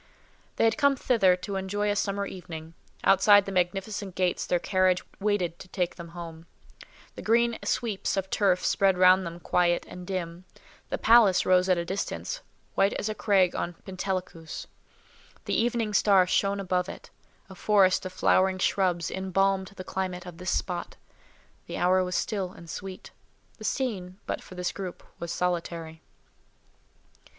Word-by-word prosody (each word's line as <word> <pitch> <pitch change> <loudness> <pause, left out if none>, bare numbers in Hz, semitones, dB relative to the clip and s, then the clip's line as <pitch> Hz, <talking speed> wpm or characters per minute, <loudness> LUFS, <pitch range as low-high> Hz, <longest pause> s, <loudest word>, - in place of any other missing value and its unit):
They - - +1
had 225 +5 +2
come 280 -1 +4
thither 220 -8 +3
to 195 +2 -5
enjoy 205 +2 -1
a - - 0
summer 200 -1 -1
evening: 165 -4 -8 0.3
outside 200 +1 +6
the 195 - -5
magnificent 190 +1 -2
gates 180 -1 0
their 175 - +2
carriage 185 0 +2 0.2
waited 195 -5 0
to - - -11
take 180 -1 -2
them 170 -1 -9
home; 165 -1 -9 0.7
the - - -9
green 235 +1 +2
sweeps 215 -5 -1
of 190 -1 -1
turf 185 -3 +2
spread 195 -2 +3
round 185 0 +5
them 170 +1 -8
quiet 175 0 +1
and 180 0 -9
dim; 180 -1 -4 0.4
the - - -1
palace 220 -5 +5
rose 185 0 +4
at 185 - +4
a 170 - -2
distance, 200 - -4 0.3
white 195 - +3
as 210 - -2
a - - -1
crag 195 -4 +2
on 175 0 -3
Pentelicus; 185 -4 -4 0.8
the - - -2
evening 230 -2 0
star 195 -2 +5
shone 200 +2 +1
above 180 -1 -1
it; - - -10 0.4
a 190 - -11
forest 190 -1 +3
of 185 - -5
flowering 185 0 +2
shrubs 185 -3 +1
embalmed 190 0 0
the 185 - -7
climate 185 -2 -4
of 175 -1 -10
this 180 0 -3
spot; 175 -1 -2 0.7
the - - -5
hour 185 +1 +3
was 180 -1 -3
still 190 -4 -2
and 170 -4 -11
sweet; 190 -1 -8 0.5
the - - -9
scene, 190 -9 -2
but - - -3
for 185 - -12
this 180 0 -2
group, 190 -3 -7 0.2
was 170 -1 -4
solitary. 170 -2 -3
185 Hz, 160 wpm, -27 LUFS, 180-200 Hz, 0.8 s, outside